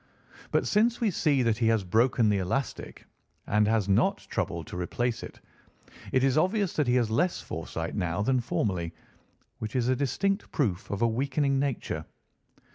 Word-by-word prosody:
But -, -, +1 dB
since 230 Hz, +3 st, +2 dB
we 225 Hz, -4 st, +2 dB
see 145 Hz, -6 st, +2 dB
that 115 Hz, -2 st, +1 dB
he 115 Hz, -, +2 dB
has 110 Hz, -3 st, +2 dB
broken 115 Hz, +5 st, +3 dB
the 100 Hz, -1 st, +2 dB
elastic 125 Hz, +9 st, -3 dB, 0.4 s
and 105 Hz, 0 st, +2 dB
has 110 Hz, -3 st, +1 dB
not 100 Hz, -, +3 dB
troubled 85 Hz, -2 st, -2 dB
to -, -, -9 dB
replace 120 Hz, +7 st, -2 dB
it, -, -, -9 dB, 0.7 s
it 130 Hz, -, +2 dB
is 135 Hz, +2 st, +3 dB
obvious 190 Hz, +2 st, +1 dB
that 150 Hz, -4 st, 0 dB
he 120 Hz, -, +3 dB
has 120 Hz, -3 st, +2 dB
less 175 Hz, +10 st, +1 dB
foresight 80 Hz, 0 st, -5 dB
now 90 Hz, 0 st, -1 dB
than 130 Hz, +3 st, +2 dB
formerly, 90 Hz, -8 st, -2 dB, 0.6 s
which 110 Hz, +2 st, -5 dB
is 125 Hz, -1 st, +1 dB
a 130 Hz, -, +3 dB
distinct 190 Hz, -, -1 dB
proof 105 Hz, -, -1 dB
of 100 Hz, +3 st, -1 dB
a -, -, +5 dB
weakening 135 Hz, +3 st, 0 dB
nature. 140 Hz, -2 st, -2 dB
120 Hz, 175 wpm, -28 LUFS, 105-140 Hz, 0.7 s, a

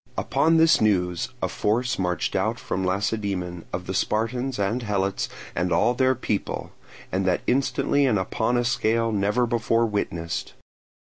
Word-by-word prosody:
Upon 165 Hz, +1 st, +2 dB
this 160 Hz, 0 st, +5 dB
news 90 Hz, -5 st, +1 dB
a -, -, +3 dB
force 120 Hz, +3 st, 0 dB
marched 90 Hz, -1 st, -1 dB
out -, -, 0 dB
from 95 Hz, -, -3 dB
Lacedaemon, 95 Hz, -2 st, -2 dB
of 90 Hz, 0 st, -4 dB
the 95 Hz, -, -4 dB
Spartans 120 Hz, +6 st, -1 dB
and 105 Hz, +5 st, 0 dB
Helots 100 Hz, -3 st, -1 dB, 0.2 s
and 90 Hz, 0 st, -1 dB
all 120 Hz, -, +3 dB
their 130 Hz, +1 st, +2 dB
people, 110 Hz, -5 st, -3 dB, 0.4 s
and 95 Hz, +1 st, 0 dB
that 90 Hz, -, +2 dB
instantly 135 Hz, +2 st, +2 dB
and 110 Hz, -5 st, +2 dB
upon 110 Hz, +5 st, 0 dB
a 120 Hz, -, +1 dB
scale 115 Hz, -2 st, +1 dB
never 105 Hz, +4 st, +1 dB
before 115 Hz, 0 st, +1 dB
witnessed. 85 Hz, -6 st, -3 dB
110 Hz, 150 wpm, -24 LUFS, 95-125 Hz, 0.4 s, this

